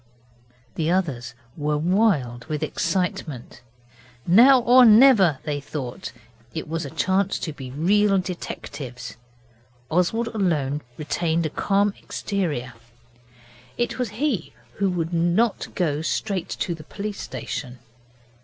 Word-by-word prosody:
The 160 Hz, 0 st, -1 dB
others 135 Hz, -10 st, -1 dB, 0.2 s
were 150 Hz, 0 st, -1 dB
wild 155 Hz, -, +1 dB
with 155 Hz, -1 st, -3 dB
excitement. 155 Hz, -7 st, -3 dB, 0.6 s
Now 245 Hz, +9 st, +7 dB
or 250 Hz, +2 st, +7 dB
never, 220 Hz, -, +7 dB
they 145 Hz, -2 st, -3 dB
thought, 135 Hz, -5 st, -6 dB, 0.4 s
was 160 Hz, 0 st, -3 dB
a -, -, -5 dB
chance 190 Hz, +5 st, 0 dB
to 160 Hz, -, -4 dB
be 135 Hz, -3 st, -8 dB
real 195 Hz, +8 st, +2 dB
detectives. 145 Hz, -8 st, -6 dB, 0.8 s
Oswald 200 Hz, +8 st, +1 dB
alone 155 Hz, -, 0 dB, 0.2 s
retained 160 Hz, +2 st, -1 dB
a 155 Hz, -, -2 dB
calm 200 Hz, +3 st, +1 dB
exterior. 150 Hz, -11 st, -3 dB, 1.0 s
It 240 Hz, +1 st, -2 dB
was 250 Hz, -3 st, -1 dB
he 250 Hz, -, -1 dB, 0.2 s
who 195 Hz, -1 st, +1 dB
would 170 Hz, -2 st, -2 dB
not 175 Hz, +7 st, +1 dB
go 155 Hz, -5 st, 0 dB
straight 190 Hz, +2 st, -2 dB
to 175 Hz, -, -2 dB
the 160 Hz, -2 st, -10 dB
police 205 Hz, +5 st, -6 dB
station. 125 Hz, -2 st, -6 dB
170 Hz, 115 wpm, -23 LUFS, 150-200 Hz, 1.0 s, Now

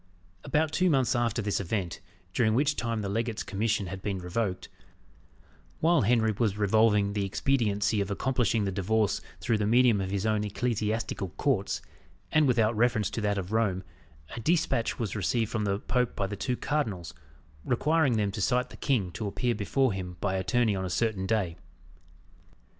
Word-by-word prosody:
About 155 Hz, 0 st, +1 dB
two 180 Hz, +3 st, +2 dB
months 135 Hz, -6 st, +2 dB
after 120 Hz, -1 st, 0 dB
this 105 Hz, 0 st, 0 dB
event, 95 Hz, -3 st, -3 dB, 0.3 s
during 110 Hz, 0 st, +2 dB
which 145 Hz, +3 st, +2 dB
time 115 Hz, -3 st, -2 dB
the -, -, -2 dB
legate's 115 Hz, +2 st, -2 dB
commission 105 Hz, +1 st, -1 dB
had 95 Hz, +1 st, -6 dB
been 100 Hz, -1 st, -2 dB
revoked, 90 Hz, +1 st, -3 dB, 1.1 s
while 165 Hz, 0 st, +4 dB
Henry 110 Hz, 0 st, +3 dB
was 105 Hz, -4 st, +1 dB
revolving 105 Hz, -1 st, +3 dB
the 100 Hz, -1 st, -1 dB
expediency 105 Hz, -1 st, +1 dB
of 100 Hz, -, -2 dB
accomplishing 115 Hz, 0 st, 0 dB
the 95 Hz, -, -1 dB
divorce 100 Hz, +2 st, 0 dB, 0.2 s
through 110 Hz, -2 st, +1 dB
the 105 Hz, -, +1 dB
medium 120 Hz, -2 st, +4 dB
of 95 Hz, -, -3 dB
his 100 Hz, +1 st, -2 dB
own 110 Hz, -1 st, +1 dB
ecclesiastical 110 Hz, -2 st, -2 dB
courts, 120 Hz, -9 st, 0 dB, 0.5 s
and 155 Hz, -1 st, +4 dB
without 115 Hz, -3 st, +2 dB
reference 115 Hz, -2 st, +2 dB
to 115 Hz, -, -3 dB
that 105 Hz, -1 st, 0 dB
of 95 Hz, 0 st, -4 dB
Rome, 100 Hz, -4 st, +1 dB, 0.5 s
a -, -, -5 dB
despatch 135 Hz, -4 st, +1 dB
was 110 Hz, -4 st, -3 dB
received 110 Hz, +2 st, 0 dB
from 110 Hz, -3 st, -1 dB
the 100 Hz, -1 st, +1 dB
Pope 125 Hz, +3 st, -1 dB
by 100 Hz, -, -1 dB
the 100 Hz, +1 st, -4 dB
two 125 Hz, +5 st, -2 dB
cardinals, 110 Hz, -, -2 dB, 0.5 s
requiring 140 Hz, 0 st, +2 dB
them 105 Hz, -2 st, +1 dB
to 105 Hz, -, -4 dB
cite 125 Hz, +5 st, +1 dB
the -, -, -11 dB
king 110 Hz, -10 st, 0 dB
to 100 Hz, +5 st, -4 dB
appear 120 Hz, +4 st, 0 dB
before 115 Hz, +3 st, +1 dB
him 90 Hz, -2 st, -6 dB
by 100 Hz, -2 st, -1 dB
attorney 105 Hz, +3 st, +1 dB
on 95 Hz, -, -2 dB
a 95 Hz, -, -3 dB
certain 95 Hz, 0 st, 0 dB
day. 95 Hz, -6 st, 0 dB
110 Hz, 175 wpm, -28 LUFS, 100-120 Hz, 1.1 s, while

